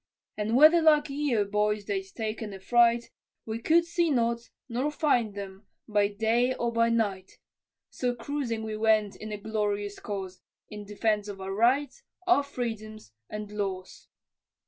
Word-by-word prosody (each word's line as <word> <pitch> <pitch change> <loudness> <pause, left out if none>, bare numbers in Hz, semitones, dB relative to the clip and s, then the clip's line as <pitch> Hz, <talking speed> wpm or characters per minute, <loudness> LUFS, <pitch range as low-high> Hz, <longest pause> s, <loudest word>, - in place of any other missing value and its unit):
And 215 +2 -1
whether 310 +5 +7
like 300 -2 +4
Yeo, 275 -7 +1
boys, 210 0 0
they'd 200 -2 -1
taken 220 -2 -4
affright, 235 +4 +3 0.3
We 220 0 -4
could 330 +7 +3
see 340 -1 +1
not, 235 -3 0 0.2
nor 255 +4 -1
find 245 -9 +1
them 195 0 -8 0.2
by 205 -2 +2
day 225 +5 +1
or 235 0 -1
by 230 0 +2
night; 205 -5 -1 0.5
So 245 -1 -1
cruising 235 -2 -3
we 220 -1 -4
went 215 -2 +2
in 215 0 -8
a 210 - -3
glorious 205 -1 -2
cause, 190 -3 -6 0.3
In 210 -1 -7
defence 210 0 0
of 200 -1 -7
our 190 0 -4
rights, 250 +7 +2 0.2
our 360 -5 +5
freedom, 225 -6 -5 0.3
and 210 -1 -6
laws. 195 -3 -5
220 Hz, 150 wpm, -28 LUFS, 205-245 Hz, 0.5 s, whether